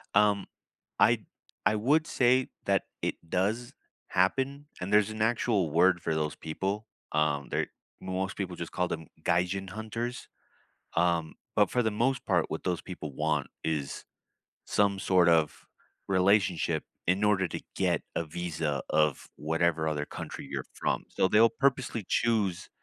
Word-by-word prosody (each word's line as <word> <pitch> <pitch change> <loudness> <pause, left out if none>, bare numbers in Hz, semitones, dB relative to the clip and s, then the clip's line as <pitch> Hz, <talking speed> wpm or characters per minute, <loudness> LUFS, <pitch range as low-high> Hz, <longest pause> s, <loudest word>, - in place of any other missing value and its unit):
Um, 100 -2 +4 0.5
I - - +5 0.5
I 110 - +4
would 145 +9 +2
say 130 +1 +3 0.2
that - - +2 0.2
it - - 0
does 105 +7 0 0.4
happen, 135 +10 +1 0.2
and 90 +2 -3
there's 105 0 +5
an 110 0 -5
actual 110 -5 +2
word 85 +2 +4
for 80 - -1
those 75 -1 -1
people. 95 +7 -3 0.2
Um, 75 -2 +1
they're - - 0 0.3
most 95 0 -2
people 95 -3 -3
just 85 -1 -6
call 90 - 0
them 80 -3 -5 0.2
"gaijin 90 +2 +1
hunters." 115 +4 -4 0.7
Um, 85 -2 +2 0.2
but, - - +4
for 125 - +1
the 110 - +1
most 120 +5 0
part, - - +2
what - - -4
those 90 -1 -1
people 80 -6 -7
want 75 0 0 0.2
is 75 -4 -2 0.6
some 100 -1 +2
sort 90 -2 +4
of 80 -3 +2 0.4
relationship 95 -4 +3 0.2
in 95 +4 +2
order 100 -3 +3
to - - -5 0.2
get - - +2
a - - 0
visa 80 -3 -2
of 75 -2 +2
whatever 80 +1 +1
other 75 -1 -1
country - - -7
you're - - -3
from. - - -1
So, - - +2
they'll 110 +4 +6
purposely 135 -6 0
choose 105 -6 +1
95 Hz, 150 wpm, -29 LUFS, 80-110 Hz, 0.7 s, they'll